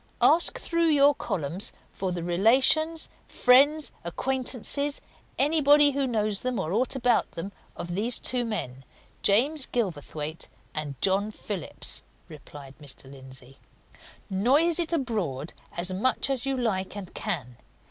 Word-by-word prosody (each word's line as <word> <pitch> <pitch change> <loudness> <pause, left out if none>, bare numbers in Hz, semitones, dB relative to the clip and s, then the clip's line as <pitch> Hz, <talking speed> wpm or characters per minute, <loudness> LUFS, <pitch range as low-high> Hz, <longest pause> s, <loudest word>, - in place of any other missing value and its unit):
"Ask 335 +2 +5
through 335 -1 0
your 290 -2 +5
columns 185 - -4 0.2
for 190 -1 -3
the 175 -1 -4
relations, 260 - +2 0.2
friends, 285 +5 +3
acquaintances, 265 +8 -2 0.4
anybody 290 0 +5
who 275 -1 -1
knows 215 -4 -1
them 250 -4 -2
or 165 -3 -3
aught 250 +5 0
about 245 -2 +1
them, 180 +4 -5 0.2
of 175 0 -6
these 225 +6 0
two 250 0 0
men, 135 - -5 0.4
James 265 +8 +3
Gilverthwaite 160 - -3 0.3
and 145 -4 -4
John 195 +2 +2
Phillips," 205 -6 -3 0.3
replied 145 -3 -12
Mr. 135 -1 -10
Lindsey. 130 0 -14 0.7
"Noise 275 - +3
it 335 -1 +8
abroad 205 - -2 0.2
as 180 +2 -1
much 255 +7 +1
as 270 0 -2
you 270 -1 -1
like 205 -5 -2
and 190 -3 -8
can! 140 - -3
215 Hz, 130 wpm, -26 LUFS, 170-275 Hz, 0.7 s, it